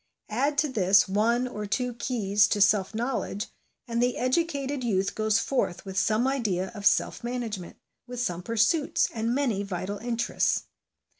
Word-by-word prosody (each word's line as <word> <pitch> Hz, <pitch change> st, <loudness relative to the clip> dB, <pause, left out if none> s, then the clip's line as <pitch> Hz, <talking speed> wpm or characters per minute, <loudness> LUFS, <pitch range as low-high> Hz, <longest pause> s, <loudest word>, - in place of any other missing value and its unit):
Add 275 Hz, +7 st, 0 dB
to 305 Hz, -, +3 dB
this 200 Hz, -6 st, +4 dB
one 230 Hz, +6 st, +1 dB
or 210 Hz, -4 st, -5 dB
two 250 Hz, +4 st, -1 dB
keys 210 Hz, -4 st, +1 dB
to 205 Hz, -, 0 dB
self 205 Hz, 0 st, +3 dB
knowledge, 230 Hz, -3 st, -2 dB, 0.4 s
and 235 Hz, 0 st, -1 dB
the 245 Hz, 0 st, +1 dB
educated 280 Hz, 0 st, 0 dB
youth 195 Hz, -4 st, 0 dB
goes 215 Hz, 0 st, +1 dB
forth 230 Hz, -8 st, -1 dB
with 190 Hz, -1 st, -7 dB
some 220 Hz, +4 st, +2 dB
idea 210 Hz, -9 st, -1 dB
of 205 Hz, -2 st, +1 dB
self -, -, +1 dB
management, 235 Hz, -7 st, -4 dB, 0.3 s
with 245 Hz, 0 st, -6 dB
some 180 Hz, -7 st, -2 dB
pursuits, 230 Hz, -, +2 dB
and 230 Hz, +1 st, -1 dB
many 250 Hz, -8 st, 0 dB
vital 195 Hz, +1 st, -4 dB
interests. 235 Hz, 0 st, 0 dB
230 Hz, 155 wpm, -27 LUFS, 200-250 Hz, 0.4 s, this